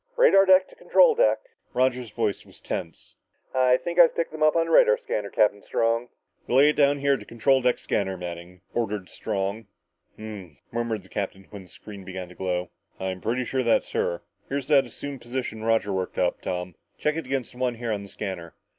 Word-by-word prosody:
"Radar 195 - +6
deck 185 0 +6
to - - -17
control - - +5
deck!" - - +3 0.3
Roger's 125 -2 +1
voice 105 -2 -2
was - - -16
tense. 85 -2 -6 0.4
"I 130 -1 +4
think 170 +5 -3
I've 170 - +7
picked 165 - -1
them 155 0 -8
up 155 +1 +4
on 165 0 +3
the 165 - -4
radar 485 0 +6
scanner, - - -3
Captain 105 -1 +2
Strong!" 115 +3 0 0.4
"Relay 135 +4 +5
it 150 - +1
down 145 0 +4
here 140 0 +2
to - - -10
control 130 +3 +2
deck 125 0 +2
scanner, 95 -2 -2
Manning," 90 +1 -8
ordered 105 -5 -2
Strong. 100 +2 -3 0.5
"Ummmh!" 100 -8 -9
murmured 115 -3 -2
the 95 - -19
captain 95 -1 -4
when 100 -2 -8
the 95 - -15
screen 100 +1 -11
began 95 -1 -7
to - - -12
glow. 90 -1 -3 0.3
"I'm 95 -1 -4
pretty 125 +3 -1
sure 130 +1 -1
that's 115 -2 +1
her. 85 - -1 0.3
Here's 140 0 -3
that 140 -3 +5
assumed 140 -3 -7
position 120 -3 -4
Roger 110 -3 +1
worked 95 -1 -3
up, 90 - 0
Tom. 90 0 -4 0.2
Check 150 0 0
it 165 -5 -4
against 135 -2 -2
this 125 - -14
one 125 -2 0
here 115 0 -4
on 105 -2 -2
the 100 - -10
scanner." 95 -6 -6
115 Hz, 205 wpm, -25 LUFS, 95-140 Hz, 0.5 s, I've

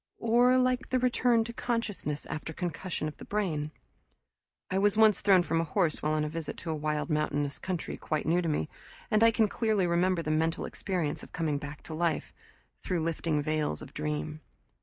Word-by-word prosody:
Or 245 +3 +4
like 255 0 +1
the 255 - +2
return 245 -2 +3
to 235 +1 -7
consciousness 230 - -2
after 155 +1 -5
concussion 175 -1 -3
of 155 - -6
the - - -10
brain. 165 -8 -1 1.0
I 190 - +2
was 205 +1 +3
once 220 -2 +5
thrown 190 -3 +5
from 165 -1 +1
a - - 0
horse 165 0 0
while 150 +1 +1
on 155 0 +1
a - - -1
visit 160 0 -5
to 165 - -4
a - - -1
wild 150 +1 -2
mountainous 145 -2 0
country 185 -3 -3
quite 155 -2 -2
new 170 +3 +3
to 170 - -1
me, 80 - 0 0.4
and 215 - +4
I 230 - +8
can 225 -1 +3
clearly 215 -3 +1
remember 175 0 +2
the 155 - -1
mental 160 +1 +1
experience 175 -6 -2
of - - -13
coming 155 -4 0
back 145 +1 -8
to 160 - -7
life, 165 0 -1 0.5
through 175 -3 -1
lifting 160 -2 0
veils 155 - -1
of - - -12
dream. 75 0 -3
165 Hz, 200 wpm, -30 LUFS, 150-210 Hz, 1.0 s, I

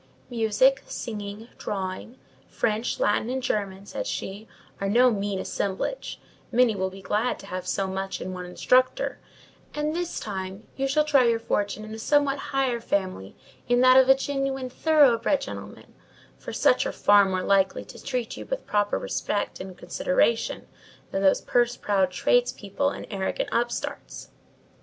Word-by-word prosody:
"Music, 240 +4 +3
singing, 210 0 -6
drawing, 195 +5 -4 0.3
French, 220 +1 -1
Latin, 210 +2 +1
and 260 0 -2
German," 200 -3 -2
said - - -5
she, 205 +3 -5 0.3
"are 195 - -1
no 245 +4 +5
mean 200 -2 -2
assemblage: 195 - -3 0.3
many 245 -2 +4
will 190 -1 -1
be 190 +1 -12
glad 220 +6 0
to - - -12
have 185 -2 -5
so 195 - 0
much 190 0 -3
in 185 - -5
one 180 0 -6
instructor; 255 - +2 0.6
and 300 +1 -1
this 350 0 -3
time, 190 0 -6
you 270 0 -1
shall 300 +3 +3
try 285 -4 +4
your 230 -1 +3
fortune 215 -1 -2
in 215 - -8
a 220 - -7
somewhat 285 +2 +2
higher 265 -3 0
family—in 200 - -2
that 255 0 +7
of 260 0 +7
some 265 0 +7
genuine, 270 -2 -2
thoroughbred 285 -3 +4
gentleman; - - -9 0.4
for - - -8
such - - +3
are - - -2
far 205 0 +5
more 185 -1 -1
likely 195 -1 +2
to - - -12
treat 250 -4 -3
you - - -8
with - - -4
proper 205 -1 +1
respect 205 - -2
and 185 -1 -8
consideration 180 +5 0 0.5
than 195 - -1
those 190 -1 +4
purse 240 0 +1
proud 195 -3 +1
tradespeople 240 +5 +1
and - - -7
arrogant 195 -2 -2
upstarts. 240 0 -3
220 Hz, 155 wpm, -26 LUFS, 195-255 Hz, 0.6 s, that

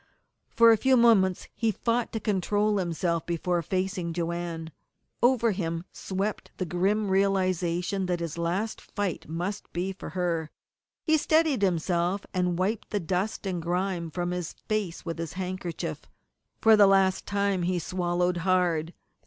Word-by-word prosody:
For 230 0 +6
a 225 - +5
few 260 +4 +4
moments 205 -6 +4
he 225 - 0
fought 230 +3 -1
to 225 - -2
control 205 +1 +1
himself 170 -1 -1
before 175 +1 0
facing 185 0 -2
Joanne. 170 -1 -3 0.5
Over 240 -2 +4
him 170 -3 -3
swept 195 +2 -3
the 185 - -2
grim 195 +5 0
realization 185 -1 +1
that 175 -1 0
his 165 -2 -4
last 175 +6 -2
fight 200 -8 -4
must 175 +5 -4
be 185 +3 -2
for 190 - -8
her. 165 -3 0 0.5
He 315 -1 +3
steadied 310 -5 +2
himself, 180 +1 +1
and 180 -2 0
wiped 200 +4 -1
the 205 - -1
dust 190 +5 -2
and 180 -3 -2
grime 175 0 -1
from 175 +2 -2
his 180 -2 -3
face 205 -6 -2
with 165 -1 -4
his 165 -2 -4
handkerchief. 180 - -4 0.5
For 220 0 +7
the 205 -2 +7
last 195 -1 +3
time 200 -2 0
he 180 +1 0
swallowed 175 0 0
hard. 175 -2 +1
185 Hz, 150 wpm, -27 LUFS, 170-200 Hz, 0.5 s, For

